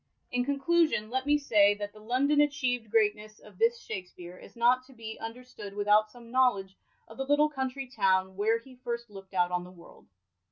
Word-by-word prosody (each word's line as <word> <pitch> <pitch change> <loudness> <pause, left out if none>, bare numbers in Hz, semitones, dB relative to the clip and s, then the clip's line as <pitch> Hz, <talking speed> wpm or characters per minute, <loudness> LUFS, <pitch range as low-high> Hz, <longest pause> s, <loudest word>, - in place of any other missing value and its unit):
In 245 0 +1
conclusion, 280 -4 +1
let 260 +2 -2
me 295 0 +4
say, 205 -8 +4
that 205 0 -6
the 215 - -14
London 260 +7 +1
achievd 260 -6 +1
greatness 215 -1 +1
of 205 -3 -17
this 230 +1 +3
Shakspere 180 -3 -8
is - - -15
not 245 +2 +3
to 270 - -16
be 225 -2 -8
understood 225 -3 -9
without 210 +1 +3
some 235 0 -15
knowledge 205 -7 +2 0.3
of 225 - -14
the 270 - -2
little 295 +1 +4
country 265 -1 -4
town 190 -6 +1
where 215 +3 +2
he 255 +3 -14
first 235 -2 -5
lookt 195 -1 -12
out 180 -1 +2
on 180 0 -1
the 180 - -11
world. 175 -2 -17
225 Hz, 195 wpm, -29 LUFS, 205-255 Hz, 0.3 s, me